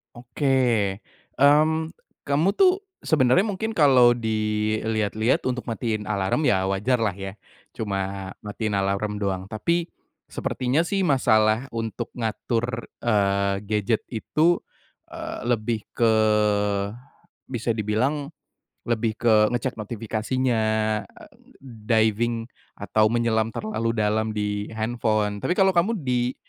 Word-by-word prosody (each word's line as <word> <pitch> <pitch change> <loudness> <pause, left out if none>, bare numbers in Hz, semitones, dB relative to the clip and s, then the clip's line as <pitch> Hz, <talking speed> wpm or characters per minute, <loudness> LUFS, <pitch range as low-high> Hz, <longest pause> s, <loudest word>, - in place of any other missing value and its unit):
Oke, 125 +4 -4 0.9
mmm, 155 +3 +3 0.3
kamu 145 +6 +2
tuh 385 0 +4 0.2
sebenarnya 150 +3 +3
mungkin 220 +1 -3
kalau 125 -5 +6
dilihat-lihat 110 0 0
untuk 125 -1 -3
matiin 110 -2 -2
alarm 105 +8 0
ya 95 -2 +3
wajarlah 110 +3 +1
ya, 95 -1 -6 0.4
cuma 95 -2 -3
matiin 105 0 -4
alarm 100 +2 -1
doang. 95 -2 -2
Tapi, 170 +10 -1 0.4
sepertinya 130 +5 0
sih 195 -1 0
masalah 110 -4 +3
untuk 115 +1 -3
ngatur, 120 +1 -2 0.2
eee, 100 -3 +2
gadget 105 +1 0
itu, 155 +9 +1 0.5
eee, - - -6
lebih 115 -2 0
ke 115 -2 +2 1.3
bisa 120 -2 -2
dibilang 130 +8 -1 0.5
lebih 115 -1 -1
ke 110 -2 +4
ngecek 120 -1 -3
notifikasinya, 115 +3 -1 0.5
a - - -17 0.4
diving 115 -1 0 0.3
atau 110 0 +2
menyelam 115 -1 +1
terlalu 215 - -2
dalam 110 +1 0
di 105 -1 -2
handphone, 110 -2 -1
tapi 180 - -1
kalau 190 0 +4
kamu 185 +6 +2
di 125 -1 0
115 Hz, 110 wpm, -24 LUFS, 105-130 Hz, 1.3 s, kalau